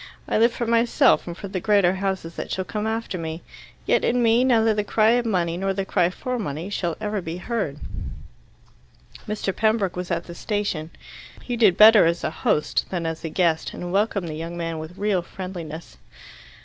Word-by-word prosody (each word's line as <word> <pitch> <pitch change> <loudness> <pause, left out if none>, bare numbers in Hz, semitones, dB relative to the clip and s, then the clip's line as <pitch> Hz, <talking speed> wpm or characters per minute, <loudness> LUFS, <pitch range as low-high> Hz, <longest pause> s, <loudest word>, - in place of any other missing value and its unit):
I - - +1
live 235 +2 +5
for 235 - -3
myself 235 +3 +3
and 170 0 -6
for 200 - -6
the 190 -1 -3
greater 200 -3 +3
houses 190 -3 -3
that - - -6
shall 185 - -2
come 210 +6 -3
after 225 -4 -3
me. 160 +1 -5 0.4
Yet - - +2
in 245 0 +2
me 230 +2 +4
neither 225 -4 +4
the 210 0 0
cry 215 +2 +3
of 240 0 +1
money 175 -5 0
nor 195 +1 -1
the 195 0 -2
cry 180 -3 +2
for 250 +6 -4
money 165 0 -4
shall 175 -5 -2
ever 210 -1 -2
be 165 0 -5
heard." 195 - -3 1.5
Mr. 205 -2 -2
Pembroke 215 -4 +1
was 180 0 -5
at 170 -1 -1
the 170 - -10
station. 190 -5 -2 0.5
He 245 - -3
did 210 -6 +4
better 215 -4 +8
as 170 +1 -1
a - - -1
host 150 -1 0
than 175 -3 -3
as 160 0 -4
a 165 - -3
guest, 165 -1 0
and 175 0 -5
welcomed 200 -2 +1
the 155 - -5
young 165 +2 -6
man 165 -1 -3
with 160 +4 -9
real 205 -3 +1
friendliness. 170 -3 -8
190 Hz, 200 wpm, -23 LUFS, 170-220 Hz, 1.5 s, better